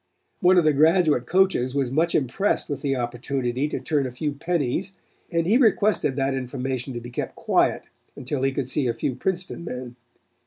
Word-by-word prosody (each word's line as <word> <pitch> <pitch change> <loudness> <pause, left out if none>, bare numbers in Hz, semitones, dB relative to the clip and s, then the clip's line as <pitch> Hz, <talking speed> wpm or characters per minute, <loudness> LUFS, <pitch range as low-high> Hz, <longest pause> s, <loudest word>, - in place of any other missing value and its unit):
One 185 +1 +5
of 175 - +5
the 155 -1 +4
graduate 155 -3 +3
coaches 180 -9 +2
was 135 -3 0
much 165 +5 +1
impressed 150 +9 0
with 145 - -3
the 140 -2 0
opportunity 125 +2 -2
to - - -3
turn 145 -4 0
a - - -6
few 145 +4 -3
pennies 160 +3 -2 0.4
and 170 -2 0
he 210 +7 +4
requested 215 - +2
that 135 0 0
the 135 - -1
information 130 0 -4
be 120 +1 -10
kept - - -4
quiet - - +1 0.3
until 130 +1 -4
he 135 0 +2
could 135 -1 -3
see 130 0 0
a 115 - -1
few 130 - -2
Princeton 180 +4 -3
men. 125 -6 -6
140 Hz, 190 wpm, -24 LUFS, 125-170 Hz, 0.4 s, One